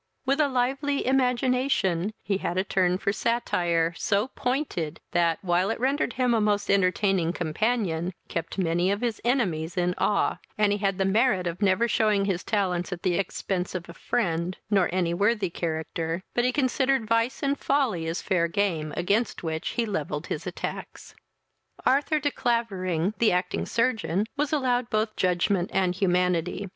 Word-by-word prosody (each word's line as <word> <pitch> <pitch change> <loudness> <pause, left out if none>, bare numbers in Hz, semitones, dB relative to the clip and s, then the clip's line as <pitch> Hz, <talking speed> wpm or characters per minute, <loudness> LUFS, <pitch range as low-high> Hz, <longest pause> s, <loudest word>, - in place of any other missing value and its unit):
With 275 +3 +1
a 300 - +4
lively 270 +2 0
imagination, 250 -7 +1
he 195 -1 -1
had 175 - -2
a 185 - +2
turn 185 -2 +1
for 200 +1 -1
satire, 175 -7 0
so 205 +8 0
pointed, 245 - -2
that, 170 -2 +2
while 180 +1 +2
it 225 - -2
rendered 270 0 0
him 250 -1 +1
a 225 - +2
most 205 -1 +1
entertaining 185 -2 +2
companion, 180 0 -1 0.2
kept 165 +2 -4
many 175 0 +1
of 200 +2 0
his 235 -3 -2
enemies 185 - 0
in 180 0 +1
awe, 205 - +1 0.2
and 210 -1 +3
he 205 - 0
had 195 -2 0
the 190 - +1
merit 200 -1 +2
of 175 +3 -4
never 200 +4 +3
shewing 215 -3 +2
his 190 -3 -1
talents 185 -4 -1
at 175 -1 -5
the 185 -2 +2
expence 185 0 -2
of 175 -2 -4
a 170 - -9
friend, 175 -4 -1
nor 195 -3 +3
any 175 -2 0
worthy 200 0 +1
character; 165 +1 -3
but 240 - +1
he 250 - +3
considered 265 -2 +1
vice 230 +4 +1
and 280 0 0
folly 240 - 0
as 165 +3 -3
fair 180 -4 +1
game, 165 -4 -1
against 205 +6 0
which 160 -1 -3
he 235 - +2
levelled 155 -7 -3
his 160 +3 -4
attacks. 180 - -6 0.7
Arthur 290 +3 +3
de 290 -1 0
Clavering, 195 -8 0
the 230 - +4
acting 180 0 -1
surgeon, 220 -5 0
was 295 0 -1
allowed 250 -5 +1
both 215 0 0
judgment 180 0 +1
and 185 -2 +1
humanity. 180 0 0
195 Hz, 170 wpm, -26 LUFS, 175-235 Hz, 0.7 s, a